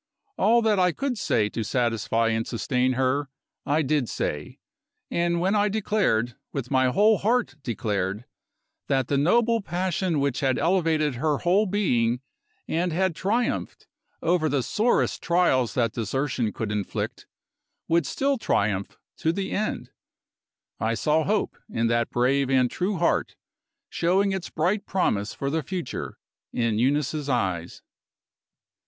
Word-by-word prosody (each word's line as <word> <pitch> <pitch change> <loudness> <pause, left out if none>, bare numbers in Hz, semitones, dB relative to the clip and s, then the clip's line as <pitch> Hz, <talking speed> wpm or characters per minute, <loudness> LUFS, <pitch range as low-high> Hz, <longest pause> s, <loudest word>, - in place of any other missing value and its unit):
All 235 +2 +3
that 215 -3 +3
I 180 -2 +3
could 275 - -2
say 105 -2 +1
to 115 - -4
satisfy 115 -1 0
and 115 0 -1
sustain 125 +2 0
her, 135 +2 0 0.4
I 150 +3 +2
did 140 -3 0
say. 75 0 -3 0.5
And 170 0 +1
when 185 +3 +1
I 210 0 +3
declared 195 - +1 0.2
with 135 -2 -5
my 130 -1 +3
whole 210 +10 +4
heart 240 0 +1
declared 105 -3 -2 0.6
that 135 -3 0
the 140 - +2
noble 230 +9 +3
passion 180 -3 -1
which 140 -2 0
had 135 -2 +1
elevated 160 -5 +2
her 145 +4 0
whole 190 +7 +2
being, 125 - +1 0.5
and 175 +2 0
had 185 0 0
triumphed 220 +8 -1 0.4
over 165 -2 +2
the 135 -2 0
sorest 225 - +1
trials 170 -9 +2
that 115 -3 +1
desertion 120 0 -1
could 110 -1 -4
inflict, 105 -2 -3 0.6
would 165 -3 +2
still 275 - 0
triumph 100 - 0 0.2
to 160 - +1
the 190 +3 -3
end, 215 +1 -2 0.9
I 115 +1 0
saw 155 +5 +1
hope, 210 +1 0
in 115 - -1
that 115 0 +1
brave 130 +2 +1
and 130 -2 +3
true 190 +2 -1
heart, 170 - +1 0.5
showing 195 +4 +1
its 190 -2 -3
bright 190 +6 0
promise 110 - 0
for 140 0 -2
the 160 +1 0
future 180 +2 -5 0.3
in 115 -3 0
Eunice's 145 +3 0
eyes. 95 -9 -2
145 Hz, 140 wpm, -25 LUFS, 120-185 Hz, 0.9 s, whole